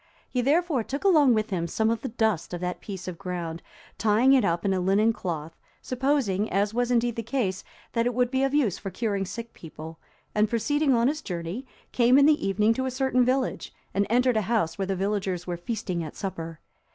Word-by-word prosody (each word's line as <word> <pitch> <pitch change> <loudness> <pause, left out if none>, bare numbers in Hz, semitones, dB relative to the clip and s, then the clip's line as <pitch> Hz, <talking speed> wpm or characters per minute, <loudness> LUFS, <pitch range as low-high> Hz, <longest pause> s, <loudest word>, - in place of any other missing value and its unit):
He 250 - -1
therefore 295 -1 +2
took 275 +5 -5
along 300 - +5
with 215 0 -1
him 170 -3 -1
some 220 +6 +1
of 230 -1 -2
the 265 - -3
dust 220 -7 0
of 175 - -7
that 180 0 -3
piece 190 -3 -7
of 180 -2 -6
ground, 175 -3 -4 0.4
tying 225 +5 +4
it 260 -4 +5
up 170 -1 0
in 195 - +2
a 185 - 0
linen 200 +5 +3
cloth, 165 -5 -5 0.2
supposing, 255 -6 0
as 200 +3 0
was 245 +1 0
indeed 240 -1 +1
the 230 - -2
case, 225 -5 -2 0.3
that 230 0 +1
it 245 - -2
would 250 0 +1
be 265 0 +1
of 270 0 +2
use 275 - +1
for 195 - -5
curing 200 -2 -2
sick 230 +4 -7
people, 160 0 -10 0.3
and 210 0 +2
proceeding 275 +5 +2
on 235 +1 +3
his 300 +3 -1
journey, 180 +8 -5 0.2
came 245 +1 +4
in 280 - +6
the 305 0 +4
evening 210 +3 +3
to 260 +3 -2
a - - 0
certain 255 -1 +2
village, 255 +1 -1 0.2
and 200 +1 +1
entered 250 0 +3
a - - +3
house 210 -9 +1
where 195 -1 -3
the 195 - -1
villagers 190 -2 -2
were 175 - -3
feasting 180 -2 -3
at 155 - -8
supper. 165 -4 -5
220 Hz, 220 wpm, -26 LUFS, 185-250 Hz, 0.4 s, in